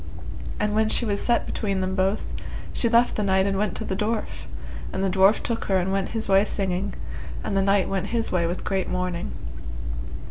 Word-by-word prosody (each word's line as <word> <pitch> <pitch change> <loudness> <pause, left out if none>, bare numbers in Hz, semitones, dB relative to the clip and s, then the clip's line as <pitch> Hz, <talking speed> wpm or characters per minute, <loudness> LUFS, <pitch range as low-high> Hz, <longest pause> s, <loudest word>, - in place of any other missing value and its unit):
And 210 0 +1
when 215 0 +3
she 240 - +6
was 200 -2 0
set 240 -1 +2
between 200 -3 -1
them 185 0 -1
both, 190 +2 0 0.4
she 235 - +3
left 235 +1 +4
the - - 0
knight 190 -1 +3
and 200 -1 +1
went 200 -1 0
to 220 - -3
the 190 - -1
dwarf, 215 +2 -2 0.5
and 190 - -1
the 195 - +2
dwarf 195 +3 +5
took 230 -1 -2
her 190 - +2
and 185 +1 0
went 195 -1 0
his 225 -1 -2
way 195 0 +6
singing, 195 -1 -1 0.5
and 200 - -2
the 195 - +4
knight 195 0 +3
went 195 -1 -1
his 230 -1 -1
way 170 -2 +2
with 175 +2 -3
great 190 -1 0
mourning. 180 -1 -2
195 Hz, 210 wpm, -25 LUFS, 190-215 Hz, 0.5 s, she